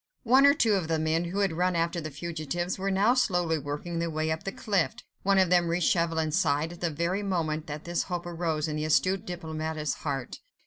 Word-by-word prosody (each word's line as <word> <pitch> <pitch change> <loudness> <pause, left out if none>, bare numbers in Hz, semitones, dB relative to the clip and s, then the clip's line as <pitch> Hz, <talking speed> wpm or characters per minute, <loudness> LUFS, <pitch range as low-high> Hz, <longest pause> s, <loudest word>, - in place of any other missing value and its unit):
One 260 +3 +6
or 280 - +6
two 225 -7 +3
of 185 -5 0
the 160 0 +1
men, 160 +2 0
who 190 +4 -2
had 195 -3 +2
run 180 +2 +1
after 170 +1 0
the 155 - -5
fugitives, 170 +4 -4
were 195 +1 -1
now 200 +5 +3
slowly 175 -10 +1
working 150 +4 -4
their 170 0 -1
way 155 0 -1
up 160 - -3
the 195 - -2
cliff: 200 -1 0 0.3
one 195 0 +3
of 185 -2 +4
them 175 -1 +4
reached 170 0 +2
Chauvelin's 165 -1 +1
side, 160 -1 +1
at 175 - -13
the 170 - +1
very 170 +6 -1
moment 165 -5 -1
that 150 0 -6
this 175 0 -1
hope 175 -1 -3
arose 165 -3 -2
in 155 -1 -3
the 150 - -2
astute 185 +6 +1
diplomatist's 160 -3 -3
heart. 135 -4 -4
170 Hz, 225 wpm, -28 LUFS, 155-185 Hz, 0.3 s, One